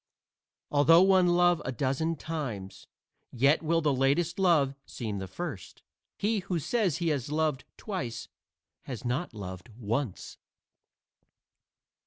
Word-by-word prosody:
Although 165 +4 +6
one 190 -2 +5
love 175 -1 +4
a 130 - -3
dozen 140 +6 -1
times, 135 -12 -6 0.4
yet 140 +5 +3
will 165 +1 +1
the 150 -3 +2
latest 140 +7 +1
love 160 -8 +3
seem 105 -5 -5
the 95 - -5
first. 130 - -7 0.3
He 215 +1 +1
who 180 -1 -2
says 185 - 0
he 170 -1 0
has 145 -2 -2
loved 155 -3 0
twice 125 - -5 0.6
has 125 -2 -6
not 125 +3 -2
loved 95 +1 -7
once. 115 -1 -3
145 Hz, 125 wpm, -29 LUFS, 120-170 Hz, 0.6 s, Although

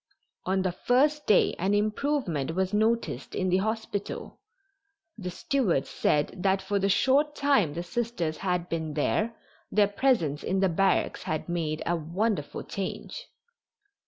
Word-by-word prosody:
On 190 0 +1
the 185 - +1
first 285 +10 +2
day 210 - +4
an 195 +4 +2
improvement 210 - 0
was 190 +1 0
noticed 225 +2 0
in 185 -1 0
the 180 - +3
hospital. 215 0 -3 0.8
The 185 -5 -5
steward 180 - 0
said 150 +2 0
that 195 0 +2
for 200 +1 -1
the 195 +1 +1
short 280 +8 +3
time 275 - +2
the 170 - -3
Sisters 180 -6 -2
had 180 -2 -1
been 160 -3 -3
there 215 +9 0 0.4
their 205 -1 +4
presence 200 - +1
in 190 - 0
the 190 -1 +3
barracks 195 +3 +1
had 155 -1 -3
made 160 -3 -2
a 175 - +1
wonderful 170 +1 -2
change. 200 - -5
195 Hz, 145 wpm, -28 LUFS, 170-225 Hz, 0.8 s, day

